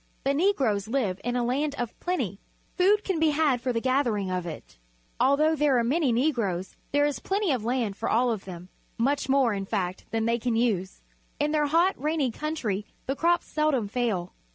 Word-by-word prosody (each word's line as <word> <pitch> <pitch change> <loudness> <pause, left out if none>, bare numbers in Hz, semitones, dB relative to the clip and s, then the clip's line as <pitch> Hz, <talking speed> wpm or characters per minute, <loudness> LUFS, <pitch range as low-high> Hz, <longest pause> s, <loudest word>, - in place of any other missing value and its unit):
The 275 - +2
Negroes 275 - +1
live 220 -7 -1
in 245 +1 -1
a 245 - +1
land 280 +4 0
of 240 -2 -3
plenty. 360 +1 -2 0.4
Food 405 +3 +3
can 375 -5 -1
be 320 0 +4
had 290 -5 +2
for 255 - 0
the 230 - 0
gathering 235 -7 0
of 180 -1 -2
it. - - -9 0.4
Although 305 +4 +3
there 290 -3 +3
are 235 - +2
many 275 +3 +1
Negroes, 230 - 0 0.2
there 290 +1 +3
is 290 -5 -1
plenty 390 - 0
of 250 -5 -1
land 235 -4 -1
for - - -3
all 240 +2 +3
of 215 -4 -4
them, 180 -1 -9 0.3
much 275 +3 0
more, 265 -4 +3
in 195 -1 -4
fact, 185 -4 -2
than 225 -1 -1
they 235 +1 +1
can 235 0 -1
u.se. 205 -6 -1 0.4
In 295 +1 +1
their 300 -1 +2
hot, 340 +6 +3
rainy 300 -4 0
country 225 -9 -3 0.2
the 270 - -1
crops 345 +3 +2
seldom 305 -8 0
fail. 205 -6 -2
250 Hz, 200 wpm, -27 LUFS, 215-300 Hz, 0.4 s, be